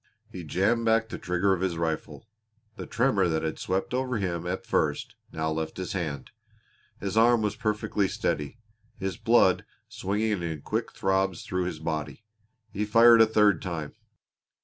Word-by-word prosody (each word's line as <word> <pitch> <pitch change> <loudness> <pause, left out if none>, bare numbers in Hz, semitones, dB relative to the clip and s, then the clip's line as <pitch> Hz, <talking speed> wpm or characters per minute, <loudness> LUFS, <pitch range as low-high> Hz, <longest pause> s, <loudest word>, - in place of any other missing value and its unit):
He 90 -4 -7
jammed 100 +9 +1
back 115 0 +2
the - - -6
trigger 90 +1 +1
of 95 - -2
his 90 -3 -1
rifle. 80 +5 -3 0.5
The - - -7
tremor 115 -6 +2
that 80 -1 -1
had 80 -1 -3
swept 95 +5 -2
over 130 -1 -1
him 90 -4 -3
at 95 +1 -3
first - - -1 0.2
now 80 0 -2
left 80 0 -3
his 95 -2 -4
hand. 75 -8 -4 0.7
His 100 +1 -4
arm 115 0 +4
was 105 - -1
perfectly 105 -2 -1
steady, 75 +2 -2 0.4
his 95 -4 -4
blood - - +3 0.2
swinging 105 0 -1
in 80 -4 -4
quick - - -2
throbs 95 -2 0
through 90 0 -2
his 90 - -4
body. 80 +4 -4 0.5
He 105 - -2
fired 115 +2 +7
a 110 - +7
third 105 -5 +3
time. 80 -5 -5
95 Hz, 165 wpm, -27 LUFS, 85-110 Hz, 0.7 s, fired